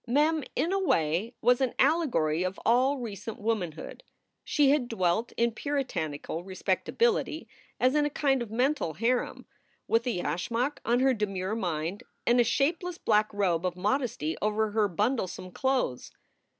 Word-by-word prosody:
Mem 300 +5 +2
in 345 +4 0
a 390 - +2
way 170 - +1
was 245 +1 +4
an 260 -3 0
allegory 235 - +2
of 185 +1 -2
all 255 +5 +3
recent 220 -3 -6
womanhood. 200 - -3 0.4
She 285 -2 +3
had 285 -4 +2
dwelt 220 +1 0
in 235 0 +2
Puritanical 175 - -3
respectability 435 - 0 0.3
as 255 +1 +3
in 300 0 +3
a 295 - +1
kind 275 -3 +1
of 235 - -4
mental 245 - 0
harem, 240 +5 -1 0.4
with 230 +2 +2
a - - +2
yashmak 230 - -1
on 240 +2 +2
her 265 0 +4
demure 195 -3 -2
mind 175 -1 -2 0.2
and 240 +1 +4
a - - +7
shapeless 330 +9 0
black 215 -5 +2
robe 185 -5 0
of 180 -1 -2
modesty 205 - -1
over 215 +1 0
her 210 -1 +2
bundlesome 190 -2 -2
clothes. 260 - -1
230 Hz, 150 wpm, -28 LUFS, 185-265 Hz, 0.4 s, a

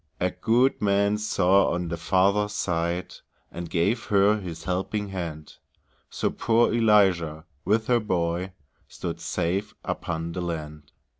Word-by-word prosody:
A 90 0 +1
good 115 +8 +2
man 100 +1 +2
saw 100 -2 +3
on 85 0 -2
the 85 - -2
farther 95 +5 +2
side, 90 -3 -2 0.4
And 85 -1 -6
gave 105 +8 0
her 105 +1 +3
his 85 -4 -7
helping 95 +4 -2
hand; 85 -5 -6 0.5
So - - -1
poor 115 0 +2
Eliza, 95 -9 +3 0.2
with 110 +4 +2
her 120 0 +3
boy, 90 -3 -1 0.3
Stood - - -6
safe 95 +5 -2
upon 85 -1 -3
the 90 - -4
land. 75 -3 -6
95 Hz, 135 wpm, -25 LUFS, 85-105 Hz, 0.5 s, saw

